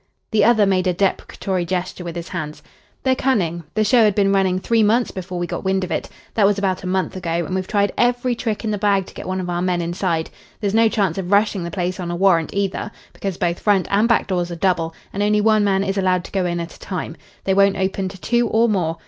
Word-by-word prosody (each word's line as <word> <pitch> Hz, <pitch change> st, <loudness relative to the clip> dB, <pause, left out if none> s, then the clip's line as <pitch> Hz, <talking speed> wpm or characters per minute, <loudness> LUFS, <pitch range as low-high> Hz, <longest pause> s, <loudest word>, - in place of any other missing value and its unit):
The 215 Hz, -2 st, +3 dB
other 220 Hz, -2 st, +5 dB
made 190 Hz, -1 st, +1 dB
a 180 Hz, -, +2 dB
deprecatory 190 Hz, -1 st, -1 dB
gesture 180 Hz, +1 st, -3 dB
with 170 Hz, -1 st, -6 dB
his 170 Hz, +1 st, -6 dB
hands. 155 Hz, -4 st, -5 dB, 0.4 s
"They're 260 Hz, -, +3 dB
cunning. 175 Hz, -, 0 dB
The 215 Hz, -, +3 dB
show 230 Hz, +2 st, +5 dB
had 210 Hz, -3 st, +3 dB
been 195 Hz, -1 st, +3 dB
running 190 Hz, -2 st, +2 dB
three 225 Hz, +4 st, +1 dB
months 225 Hz, +3 st, +2 dB
before 185 Hz, -1 st, -6 dB
we 175 Hz, -, -1 dB
got -, -, -5 dB
wind 190 Hz, 0 st, +1 dB
of 180 Hz, -, -5 dB
it. -, -, -2 dB, 0.2 s
That 205 Hz, -3 st, +4 dB
was 205 Hz, 0 st, +2 dB
about 190 Hz, -2 st, -1 dB
a -, -, -4 dB
month 190 Hz, +1 st, -1 dB
ago, 170 Hz, -2 st, -2 dB
and 185 Hz, -, -5 dB
we've 185 Hz, 0 st, -2 dB
tried 205 Hz, -2 st, +1 dB
every 245 Hz, +1 st, +2 dB
trick 225 Hz, -2 st, -3 dB
in 220 Hz, -, -1 dB
the 205 Hz, -, -2 dB
bag 200 Hz, -2 st, +2 dB
to -, -, -14 dB
get -, -, -8 dB
one 185 Hz, 0 st, -2 dB
of 180 Hz, -, -4 dB
our 175 Hz, 0 st, -2 dB
men 180 Hz, -1 st, 0 dB
inside. 170 Hz, -1 st, -2 dB, 0.3 s
There's 205 Hz, -2 st, -1 dB
no 225 Hz, 0 st, +5 dB
chance 195 Hz, -5 st, 0 dB
of 185 Hz, 0 st, -4 dB
rushing 200 Hz, -2 st, +2 dB
the 170 Hz, -, -4 dB
place 185 Hz, 0 st, -3 dB
on 175 Hz, -2 st, -4 dB
a 175 Hz, -, -2 dB
warrant 175 Hz, -3 st, +3 dB
either, 200 Hz, +1 st, -2 dB, 0.2 s
because 195 Hz, -3 st, -4 dB
both 170 Hz, 0 st, -1 dB
front 200 Hz, -4 st, +2 dB
and 205 Hz, +3 st, +3 dB
back 235 Hz, -, +3 dB
doors 175 Hz, -2 st, -1 dB
are 170 Hz, -, -5 dB
double, 165 Hz, -2 st, 0 dB, 0.2 s
and 200 Hz, -, -2 dB
only 210 Hz, +1 st, +3 dB
one 215 Hz, 0 st, +3 dB
man 195 Hz, -1 st, +2 dB
is 195 Hz, 0 st, -1 dB
allowed 185 Hz, -2 st, +1 dB
to -, -, -11 dB
go 190 Hz, -2 st, 0 dB
in 175 Hz, 0 st, -2 dB
at 170 Hz, -1 st, -6 dB
a -, -, -16 dB
time. 170 Hz, -3 st, -5 dB, 0.3 s
They 190 Hz, -, +1 dB
won't 195 Hz, 0 st, +4 dB
open 190 Hz, 0 st, -1 dB
to 190 Hz, 0 st, -11 dB
two 240 Hz, +4 st, +1 dB
or 225 Hz, +2 st, +3 dB
more. 175 Hz, -6 st, 0 dB
190 Hz, 260 wpm, -20 LUFS, 180-205 Hz, 0.4 s, other